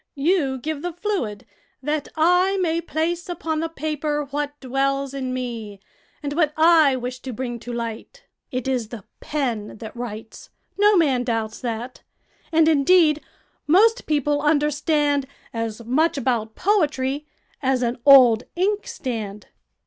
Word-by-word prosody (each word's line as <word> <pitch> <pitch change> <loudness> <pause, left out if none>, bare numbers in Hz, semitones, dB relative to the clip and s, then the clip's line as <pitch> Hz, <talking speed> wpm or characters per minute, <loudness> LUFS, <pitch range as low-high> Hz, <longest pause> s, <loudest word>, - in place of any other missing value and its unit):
You 285 -3 +1
give 300 +3 -4
the 350 0 -4
fluid 345 - -3 0.4
that 295 +1 -1
I 360 +4 +3
may 335 -3 0
place 340 +2 -2
upon 320 -3 -2
the 330 +1 -2
paper 300 -1 -2
what 290 0 -3
dwells 275 +1 -1
in 260 -2 -3
me, 230 -5 -5 0.4
and 285 0 -3
what 305 -1 +1
I 315 -4 +6
wish 250 0 -5
to 260 - -7
bring 240 0 -4
to 240 +2 -8
light. 235 - -6 0.3
It 255 0 -3
is 250 -4 -1
the 220 -3 -9 0.2
pen 240 -9 -3
that 220 +1 -9
writes: 225 -2 -8 0.3
no 415 0 +4
man 270 -7 +2
doubts 225 -2 -2
that; 240 0 -5 0.5
and, 320 -1 +4
indeed, 310 0 +4 0.5
most 435 +9 +4
people 295 -1 +1
understand 295 -1 +1 0.3
as 230 0 -4
much 300 +7 +2
about 230 -4 -1
poetry 295 -7 0 0.3
as 260 -2 +1
an 240 +1 -1
old 250 -5 +7
inkstand." 255 - -3
280 Hz, 140 wpm, -23 LUFS, 245-315 Hz, 0.5 s, old